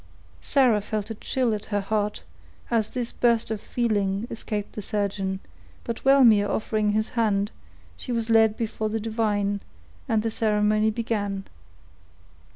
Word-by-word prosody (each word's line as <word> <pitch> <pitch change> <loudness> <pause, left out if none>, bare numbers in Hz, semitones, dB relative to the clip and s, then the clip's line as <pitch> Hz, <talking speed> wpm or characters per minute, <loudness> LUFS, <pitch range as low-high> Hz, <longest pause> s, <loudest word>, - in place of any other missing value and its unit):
Sarah 245 -6 +3
felt 210 +1 -3
a - - -1
chill 240 +2 -1
at 210 -1 -4
her 205 -2 -1
heart, 210 +1 -1 0.5
as 225 -2 +2
this 245 -2 -3
burst 235 -2 +2
of 215 -2 -3
feeling 205 -3 0
escaped 210 -2 -4
the 210 - -5
surgeon; 195 -2 -2 0.4
but 230 -1 -5
Wellmere 235 -7 +6
offering 215 0 0
his 215 +1 0
hand, 210 -4 +1 0.5
she 245 - -6
was 230 -2 -1
led 225 -1 +4
before 220 -2 -2
the 225 +1 -1
divine, 205 -2 0 0.5
and 220 -1 +2
the 225 - -1
ceremony 215 0 +2
began. 210 -3 -2
215 Hz, 145 wpm, -25 LUFS, 205-230 Hz, 0.5 s, Wellmere